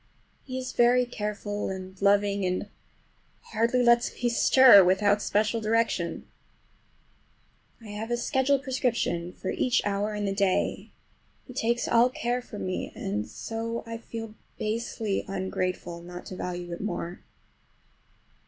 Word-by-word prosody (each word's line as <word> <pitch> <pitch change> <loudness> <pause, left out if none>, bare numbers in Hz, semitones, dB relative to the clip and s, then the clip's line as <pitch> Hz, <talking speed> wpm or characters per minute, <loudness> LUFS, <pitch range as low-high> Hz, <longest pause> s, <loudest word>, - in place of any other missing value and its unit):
He 255 -1 -5
is 255 0 -4
very 245 +1 +4
careful 210 -3 -4
and 190 0 -7
loving, 200 0 +3
and 185 0 -1 0.9
hardly 235 +3 +2
lets 235 0 +4
me 240 - +3
stir 240 -3 +8
without 200 +3 +3
special 215 +3 +1
direction. 215 -6 0 1.5
I 225 -2 -12
have 210 +2 -5
a 240 - 0
schedule 265 +3 +2
prescription 245 -10 -1
for 190 - -5
each 255 0 +1
hour 205 +1 -1
in 210 0 -2
the 195 - 0
day; 195 -1 0 0.6
he 255 - -11
takes 240 -1 0
all 235 +2 +5
care 245 0 -2
from 215 -5 -7
me, 185 0 -3
and 105 +2 -3
so 230 +1 -4
I 230 0 -6
feel 225 -1 -7 0.2
basely 220 -1 -2
ungrateful 185 -2 -3
not 175 +1 -9
to 185 - -7
value 175 -1 -5
it 170 - -6
more. 175 -3 -4
210 Hz, 135 wpm, -27 LUFS, 190-235 Hz, 1.5 s, stir